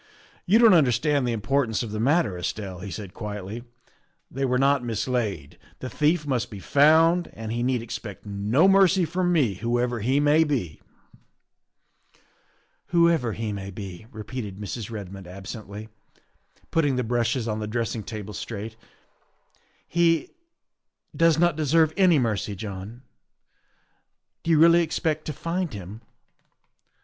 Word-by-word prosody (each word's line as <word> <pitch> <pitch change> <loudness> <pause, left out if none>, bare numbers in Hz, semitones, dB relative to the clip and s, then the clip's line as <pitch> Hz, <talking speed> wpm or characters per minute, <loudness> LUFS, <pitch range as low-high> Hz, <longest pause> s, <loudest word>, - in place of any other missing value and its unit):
You 200 +5 +5
don't 230 -3 +7
understand 145 -2 +3
the - - 0
importance 115 +2 0
of 110 - -6
the 110 - -4
mat 145 +8 +3
ter, 100 -4 -5
Estelle," 95 +1 -5
he 100 +2 -7
said 100 -1 -7
quietly; 105 +2 -6 0.4
" 175 -1 -44
they 135 +1 -1
were 125 -1 +1
not 135 0 +3
mislaid. 115 - -3 0.2
The 130 - -7
thief 155 +1 +1
must 130 -6 -1
be 105 - -8
found, 160 - +4
and 110 0 -6
he 120 +1 -2
need 125 -1 0
expect 110 -3 -7
no 105 - +2
mercy 195 -2 +5
from 180 +2 0
me 140 - +2
whoever 120 +4 -1
he 130 +6 +1
may 150 +2 +4
be." 125 - -3 1.4
" - - -37 0.5
"Whoever 170 -9 +3
he 110 -1 -3
may 100 -1 -6
be," 100 -1 -8
repeated 110 -3 -6
Mrs. 105 +1 -6
Redmond 100 -4 -8
ab 95 +2 -10
sently, 105 +1 -8 0.8
putting 145 -5 +2
the 125 - 0
brushes 120 +1 0
on 110 -1 -2
the 105 - -4
dressing 115 0 -2
table 105 -2 -7
straight, 110 0 -6 0.6
" - - -39
he 165 -2 +3 0.8
does 165 -1 +4
not 175 -1 +3
deserve 155 +1 +2
any 185 -4 +5
mercy, 110 -5 -1
John. 105 +4 -8 1.4
Do - - -5
you 160 - +5
really 170 +2 +6
expect 155 -1 -1
to 155 - -4
find 170 +1 -3
him? 100 +3 -9
120 Hz, 150 wpm, -25 LUFS, 105-155 Hz, 1.4 s, don't